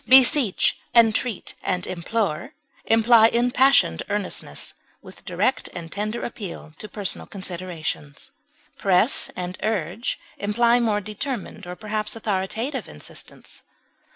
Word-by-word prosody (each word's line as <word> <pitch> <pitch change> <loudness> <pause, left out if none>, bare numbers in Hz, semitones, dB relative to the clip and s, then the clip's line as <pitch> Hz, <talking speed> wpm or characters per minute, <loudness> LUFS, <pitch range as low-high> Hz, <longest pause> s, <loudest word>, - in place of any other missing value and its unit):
Beseech, 260 -4 +5 0.2
entreat, 230 0 +3
and 180 -1 -1
implore 185 -1 -2 0.3
imply 225 0 +6
impassioned 250 +4 +3
earnestness, 205 -2 -3 0.3
with - - -13
direct 260 - 0
and 170 -1 -7
tender 215 +3 -3
appeal 190 -9 -7
to 215 - -8
personal 200 -1 -3
considerations. 170 - -5 0.5
Press 195 +6 +4
and 180 0 -5
urge 210 +1 -2 0.2
imply 235 +4 +3
more 215 -3 +1
determined 215 -1 -5
or 180 - -5
perhaps 215 +1 -3
authoritative 220 +5 -2
insistence. 75 - -11
210 Hz, 105 wpm, -24 LUFS, 185-235 Hz, 0.5 s, imply